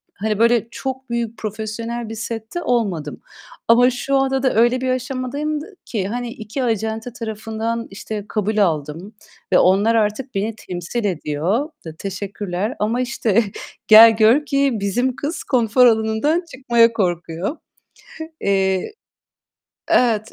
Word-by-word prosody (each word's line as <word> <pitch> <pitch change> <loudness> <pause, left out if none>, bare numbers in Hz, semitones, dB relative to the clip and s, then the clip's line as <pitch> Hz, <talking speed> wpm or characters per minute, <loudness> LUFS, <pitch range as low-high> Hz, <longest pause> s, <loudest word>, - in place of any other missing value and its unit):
hani, 215 0 -2
böyle, 235 -1 +3
çok 265 -1 -5
büyük 235 -1 -3
profesyonel 220 +2 -5
bir 225 - -6
sette 225 +8 -5
olmadım 195 -12 -1 0.5
ama 245 +2 +6
şu 255 +3 -2
anda 270 0 +1
da 260 - +2
öyle 240 +3 +3
bir 260 - -1
aşamadayım 270 +4 -2
d - - -8 0.2
ki, 200 -5 -2
hani, 240 +2 -4
2 225 +4 -5
acente 225 +1 -2
tarafından, 225 0 -4
işte, 210 +1 -6
kabul 215 0 -1
aldım 165 +2 -1 0.4
ve - - +6
onlar 200 +5 +4
artık 220 +3 -1
beni 215 +3 -1
temsil 185 +4 -5
ediyor. 180 - -1 0.2
D 160 -1 -8
teşekkürler 195 +2 -4
ama 225 +4 0
işte 230 -3 +1 0.4
gel 225 +1 +9
gör 230 +7 +4
ki 275 -1 +2
bizim 235 +5 -1
kız 305 +4 -4
konfor 250 -1 +3
alanından 225 +9 +2
çıkmaya 235 -3 +3
korkuyor. 175 - -2 0.8
Eee 195 - 0 1.0
Evet, 225 -3 +2
225 Hz, 135 wpm, -20 LUFS, 205-245 Hz, 1.0 s, gel